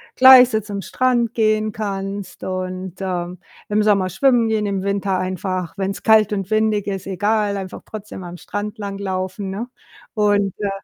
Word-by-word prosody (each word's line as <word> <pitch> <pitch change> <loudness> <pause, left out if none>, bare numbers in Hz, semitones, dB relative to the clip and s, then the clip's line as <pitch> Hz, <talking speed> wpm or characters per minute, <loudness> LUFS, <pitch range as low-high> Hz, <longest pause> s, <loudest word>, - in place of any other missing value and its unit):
gleich 255 -1 +9
so 220 - +1
zum 205 -2 -6
Strand 245 -2 0
gehen 215 -1 +1
kannst, 200 -2 -5
und, 185 -1 -4
ähm, 180 -1 -3 0.3
im 210 +1 +2
Sommer 200 -3 +3
schwimmen 235 +4 +3
gehen, 215 -1 0
im 195 -2 -2
Winter 200 -1 0
einfach, 185 -1 -3
wenn's 195 0 -3
kalt 215 -2 +5
und 195 -2 -3
windig 215 -2 +1
ist, 195 -2 -3
egal 205 +1 0
einfach 190 -1 -7
trotzdem 210 -3 -8
am 175 0 -8
Strand 205 +4 -5
langlaufen, 195 -1 -4
ne? 205 +6 -4 0.5
Und, 205 -3 +2
äh 205 -1 -1
200 Hz, 160 wpm, -20 LUFS, 190-215 Hz, 0.5 s, gleich